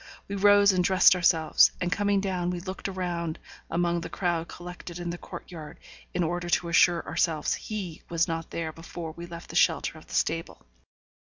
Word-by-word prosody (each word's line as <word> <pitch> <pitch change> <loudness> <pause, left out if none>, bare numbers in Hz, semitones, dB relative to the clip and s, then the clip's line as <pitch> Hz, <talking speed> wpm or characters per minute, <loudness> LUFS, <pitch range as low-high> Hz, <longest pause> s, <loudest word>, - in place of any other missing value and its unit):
We 200 - -4
rose 205 0 +6
and 185 -1 +1
dressed 190 +1 +6
ourselves, 165 -3 +4
and 180 0 -1
coming 200 +1 +1
down 185 -3 -1
we 180 -1 -2
looked 185 +2 -5
around 175 -3 -3 0.3
among 170 0 0
the - - -6
crowd 170 -3 -1
collected 175 0 -9
in 175 -1 -4
the 175 - -5
court - - -9
yard, 155 -4 -9 0.3
in 180 - 0
order 175 +1 -2
to 175 0 +1
assure 170 0 +4
ourselves 160 -3 0
he 195 -7 -5
was 170 0 +1
not 165 -1 -4
there 165 -1 -3
before 165 0 -7
we 170 +2 -9
left 170 0 -9
the - - -9
shelter 160 -1 +2
of - - -19
the - - -7
stable. 165 - -1
175 Hz, 190 wpm, -27 LUFS, 165-185 Hz, 0.3 s, rose